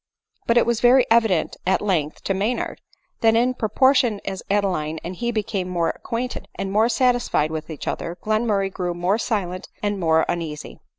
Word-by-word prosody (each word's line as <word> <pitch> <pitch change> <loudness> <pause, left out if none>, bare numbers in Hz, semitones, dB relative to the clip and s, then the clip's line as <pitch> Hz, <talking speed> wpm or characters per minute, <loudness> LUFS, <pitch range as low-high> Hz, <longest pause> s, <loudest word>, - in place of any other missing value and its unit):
But 235 - +3
it 240 - +5
was 235 -1 0
very 250 +1 +6
evident, 225 -7 +3
at 190 - +3
length, 165 -7 -1
to 195 - 0
Maynard, 205 +6 -2 0.4
that 225 -1 +4
in 245 +2 +3
proportion 250 -1 +2
as 190 -1 -4
Adeline 185 -6 0
and 180 +2 -5
he 240 +5 -2
became 205 -4 -2
more 170 -2 0
acquainted 245 +2 -5
and 195 - -4
more 220 +3 +3
satisfied 245 - +1
with 155 0 -5
each 155 -3 -7
other, 170 +1 -3
Glenmurray 215 -3 +1
grew 180 -2 -3
more 180 +5 +1
silent 185 -6 -2
and 205 -1 -1
more 160 -2 +3
uneasy. 160 -4 -4
200 Hz, 175 wpm, -22 LUFS, 175-235 Hz, 0.4 s, very